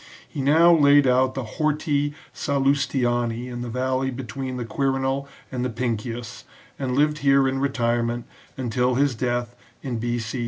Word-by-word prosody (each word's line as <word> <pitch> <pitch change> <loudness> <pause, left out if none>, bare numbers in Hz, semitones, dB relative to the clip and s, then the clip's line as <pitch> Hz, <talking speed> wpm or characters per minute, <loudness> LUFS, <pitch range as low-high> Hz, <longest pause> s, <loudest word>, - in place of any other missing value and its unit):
He 145 - -5
now 160 +5 +6
laid 145 -2 +6
out 130 +1 +3
the 135 - -2
Horti 145 +3 -1 0.2
Sallustiani 130 -4 0
in 120 -1 -6
the 120 - -4
valley 130 +2 -1
be 130 +1 -5
tween 130 +2 -5
the 120 - -4
Quirinal 135 +2 -1 0.2
and 125 -2 -2
the 125 - 0
Pincius, 120 +1 -4 0.4
and 130 -2 -1
lived 150 +1 +2
here 140 -1 +4
in 135 0 -1
retirement 120 -3 0 0.3
until 125 0 0
his 140 0 +2
death 120 +1 -2 0.3
in 125 -4 -3
B.C. 120 +1 -2
130 Hz, 155 wpm, -24 LUFS, 120-140 Hz, 0.4 s, now